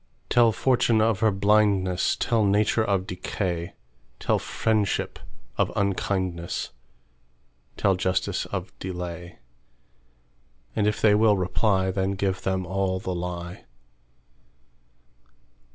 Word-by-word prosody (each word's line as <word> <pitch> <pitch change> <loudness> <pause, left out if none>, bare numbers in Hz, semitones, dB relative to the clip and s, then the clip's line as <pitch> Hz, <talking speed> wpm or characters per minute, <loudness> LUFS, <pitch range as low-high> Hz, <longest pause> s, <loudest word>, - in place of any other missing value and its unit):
Tell 120 -2 +5
fortune 120 -1 +2
of 110 -2 +2
her 110 - +4
blindness; 100 -2 +2
Tell 115 -2 +1
nature 105 +2 +2
of 100 -3 0
decay; 90 -1 -3 0.5
Tell - - +1
friendship 110 -3 -1 0.4
of - - +2
unkindness; 95 -3 -1 1.1
Tell 100 - +3
justice 90 0 -1
of - - -5
delay; 90 -1 -6 1.4
And 105 - +2
if 105 - 0
they 105 -2 +5
will 105 -1 +4
reply, 95 +1 +1
Then 95 +1 -1
give 95 -1 -1
them 95 -1 -1
all 95 0 -1
the 95 0 -4
lie. 90 0 -6
95 Hz, 105 wpm, -25 LUFS, 90-105 Hz, 1.4 s, Tell